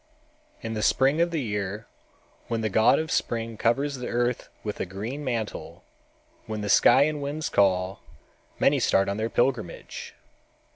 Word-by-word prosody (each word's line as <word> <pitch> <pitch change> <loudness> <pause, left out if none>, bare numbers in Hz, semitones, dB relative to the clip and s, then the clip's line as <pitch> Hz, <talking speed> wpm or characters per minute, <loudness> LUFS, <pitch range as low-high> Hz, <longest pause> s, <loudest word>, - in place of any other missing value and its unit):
In 115 0 -3
the 110 - -2
spring 135 +8 +3
of 170 - +3
the 160 -5 -2
year, 105 -1 -3 0.6
when 115 -1 -1
the 110 -2 -1
god 110 - +5
of 160 0 -2
spring 115 -1 -1
covers 135 +6 0
the 125 - -5
earth 120 0 -1
with 105 -1 -4
a - - -1
green 110 +10 -5
mantle, 115 -5 -4 0.6
when 110 -1 -4
the 105 - -3
sky 130 +6 +6
and 150 0 -1
winds 145 +2 -3
call, 95 -1 +2 0.6
many - - +3
start 95 - +3
on 100 +1 -2
their 110 +1 -1
pilgrimage. 120 -7 -2
115 Hz, 160 wpm, -26 LUFS, 105-135 Hz, 0.6 s, sky